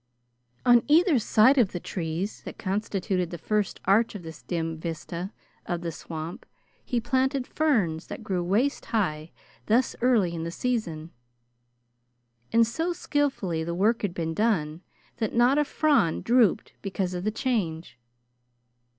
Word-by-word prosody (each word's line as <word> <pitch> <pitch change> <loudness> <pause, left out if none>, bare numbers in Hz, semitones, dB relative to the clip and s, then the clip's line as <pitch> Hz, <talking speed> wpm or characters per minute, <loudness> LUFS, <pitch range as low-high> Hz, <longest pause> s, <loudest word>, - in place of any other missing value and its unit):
On 240 -1 +7
either 315 -1 +5
side 230 +5 +5
of 220 -6 +3
the 175 - -3
trees 170 +4 -4
that - - -9
constituted 190 -2 -1
the 175 - -6
first 210 +4 -1
arch 210 +4 +3
of 195 - -7
this 160 -2 -9
dim 165 -2 -3
vista 170 +3 -5 0.4
of 175 -1 -2
the 170 -1 -3
swamp 160 +1 -7 0.4
he 245 - -1
planted 260 +2 0
ferns 210 - 0
that - - -7
grew 185 -4 -1
waist 220 +11 0
high 160 -8 -1 0.4
thus 240 +3 +2
early 225 -8 +3
in 165 - -4
the 165 - -3
season, 170 -7 -3 1.4
and 230 0 +5
so 325 +10 -2
skilfully 265 - -1
the 170 +1 -3
work 215 +6 +2
had 195 -4 -2
been 165 -1 -2
done 165 -6 0 0.4
that 220 0 -2
not 245 +4 +4
a - - +4
frond 285 - +2
drooped 235 -5 +3
because 190 -2 -2
of 180 0 -4
the 215 - +1
change. 180 - -2
195 Hz, 150 wpm, -26 LUFS, 170-240 Hz, 1.4 s, On